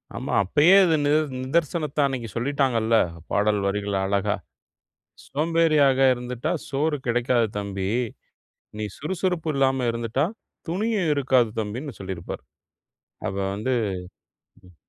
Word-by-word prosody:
ஆமா. -, -, -4 dB
அப்பயே 150 Hz, -, +5 dB
இது 165 Hz, -2 st, +3 dB
நித 145 Hz, -, +3 dB, 0.3 s
நிதர்சனத்த 155 Hz, +1 st, -1 dB
அன்னைக்கு 125 Hz, -4 st, -4 dB
சொல்லிட்டாங்கல்ல. 120 Hz, -3 st, +1 dB, 0.4 s
பாடல் 105 Hz, 0 st, +2 dB
வரிகள் 100 Hz, 0 st, -1 dB
அழகா! 100 Hz, 0 st, +1 dB, 0.9 s
"சோம்பேறியாக 155 Hz, -2 st, +3 dB, 0.2 s
இருந்துட்டா 125 Hz, 0 st, -3 dB, 0.2 s
சோறு 150 Hz, +2 st, 0 dB
கிடைக்காது 120 Hz, -1 st, +2 dB
தம்பி. 100 Hz, -2 st, -3 dB, 0.9 s
நீ 110 Hz, -, -2 dB
சுறுசுறுப்பு 170 Hz, 0 st, -1 dB
இல்லாம 135 Hz, -2 st, +2 dB
இருந்துட்டா, 115 Hz, +4 st, -1 dB, 0.4 s
துணியும் 195 Hz, -2 st, 0 dB
இருக்காது 130 Hz, -4 st, +3 dB
தம்பின்னு" 115 Hz, +3 st, -6 dB
சொல்லியிருப்பார். 95 Hz, -3 st, -6 dB, 0.8 s
அப்போ 100 Hz, 0 st, -2 dB
வந்து 110 Hz, +6 st, -1 dB, 0.9 s
ம். 90 Hz, -, -18 dB
130 Hz, 105 wpm, -24 LUFS, 110-150 Hz, 0.9 s, அப்பயே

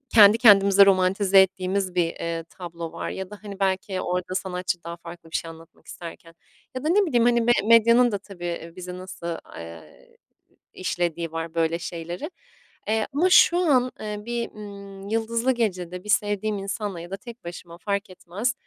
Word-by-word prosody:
kendi 210 Hz, 0 st, +9 dB
kendimize 200 Hz, -4 st, +7 dB
romantize 195 Hz, +1 st, +4 dB
ettiğimiz 190 Hz, 0 st, -1 dB
bir, 175 Hz, -, +3 dB
eee, 165 Hz, 0 st, -4 dB
tablo 170 Hz, -2 st, -7 dB
var -, -, -5 dB
ya 190 Hz, -1 st, -6 dB
da, 210 Hz, 0 st, -10 dB
hani, 205 Hz, -2 st, -9 dB
belki 190 Hz, 0 st, -1 dB
orada 180 Hz, +1 st, -2 dB
sanatçı 180 Hz, -2 st, -3 dB
daha 170 Hz, 0 st, -7 dB
farklı 170 Hz, -1 st, -12 dB
bir -, -, -5 dB
şey 165 Hz, -, -2 dB
anlatmak 165 Hz, 0 st, -15 dB
isterken 165 Hz, -1 st, -10 dB, 0.4 s
ya 255 Hz, -, -4 dB
da 310 Hz, -, 0 dB
ne 400 Hz, +4 st, +4 dB
bileyim, 240 Hz, -8 st, +2 dB
hani, 240 Hz, -1 st, +4 dB
me 235 Hz, +1 st, +3 dB
medyanın 230 Hz, +2 st, +6 dB
da 205 Hz, -, -1 dB
tabii 175 Hz, -4 st, -7 dB
bizi 180 Hz, 0 st, -7 dB
nasıl, 170 Hz, -2 st, -6 dB, 0.2 s
eee, 85 Hz, -1 st, -12 dB, 0.6 s
işlediği 170 Hz, -3 st, -2 dB
var 165 Hz, 0 st, -5 dB
böyle 165 Hz, 0 st, +1 dB
şeyleri. 170 Hz, -, -6 dB, 0.6 s
Eee, 220 Hz, 0 st, +1 dB
ama 320 Hz, +6 st, +3 dB
şu 350 Hz, -, +7 dB
an, 265 Hz, -8 st, +3 dB
eee, 210 Hz, -1 st, -4 dB
bir, 235 Hz, 0 st, -3 dB
ııı, 200 Hz, -1 st, -10 dB
yıldızlı 230 Hz, +3 st, +1 dB
gecede 180 Hz, -7 st, -2 dB
bir 210 Hz, -, -11 dB
sevdiğim 210 Hz, 0 st, +1 dB
insanla 200 Hz, -2 st, -4 dB
ya 175 Hz, +2 st, -10 dB
da 195 Hz, -, -3 dB
tek 235 Hz, +2 st, -12 dB
başıma 170 Hz, 0 st, -9 dB
fark 200 Hz, +1 st, -2 dB
etmez, 190 Hz, +6 st, -3 dB
195 Hz, 175 wpm, -24 LUFS, 175-215 Hz, 0.6 s, kendi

